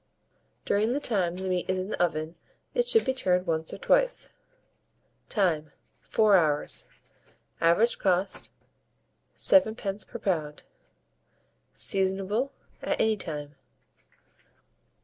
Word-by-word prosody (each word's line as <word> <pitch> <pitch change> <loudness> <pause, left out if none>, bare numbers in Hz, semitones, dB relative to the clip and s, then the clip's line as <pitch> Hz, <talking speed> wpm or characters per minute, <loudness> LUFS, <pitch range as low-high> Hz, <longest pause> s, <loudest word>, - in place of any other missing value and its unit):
During 215 +4 +1
the 280 - 0
time 190 -10 0
the 190 +1 -5
meat 180 -1 -1
is 185 - +1
in 185 +2 -3
the - - -2
oven 155 -2 0 0.4
it 485 -1 +1
should 450 -2 +4
be 260 - +1
turned 180 -8 +1
once 160 -2 -1
or - - -6
twice. - - +1 1.0
Time. 160 - 0 0.3
4 215 -2 +3
hours. 150 -4 0 0.7
Average 170 +8 +3
cost, 190 0 0 0.9
7d. 220 -7 +2
per 235 - -7
lb. 155 -8 -2 1.1
Seasonable 195 +6 0 0.3
at - - -1
any 220 0 +3
time. 150 -6 -6
190 Hz, 110 wpm, -27 LUFS, 170-220 Hz, 1.1 s, should